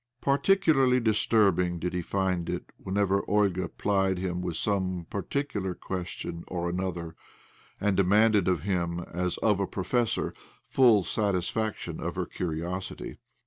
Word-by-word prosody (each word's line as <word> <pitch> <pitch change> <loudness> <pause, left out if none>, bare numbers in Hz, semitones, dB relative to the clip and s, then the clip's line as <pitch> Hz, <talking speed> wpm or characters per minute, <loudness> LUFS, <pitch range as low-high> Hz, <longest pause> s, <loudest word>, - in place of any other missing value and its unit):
Particu 165 +5 +3
larly 130 -2 +4
disturbing 100 -5 +3
did 90 +2 -3
he 90 - -1
find 90 -1 -1
it - - -4
whenever 100 0 0
Olga 100 -3 +2
plied 95 -2 +1
him 90 -1 -2
with 90 -3 -3
some 95 -4 -1
particular 100 -3 -2
question 85 -2 -5
or 85 -1 -2
another, 85 -3 -3 0.6
and 105 -1 +1
demanded 105 +1 +4
of 90 - +1
him, 90 -3 -1
as 90 +1 -2
of 105 -3 +3
a 100 - 0
professor, 115 +5 -1 0.3
full 120 -7 +4
satisfaction 105 +2 -1
of - - -3
her - - -1
curiosity. 90 +2 -4
95 Hz, 135 wpm, -28 LUFS, 90-105 Hz, 0.6 s, larly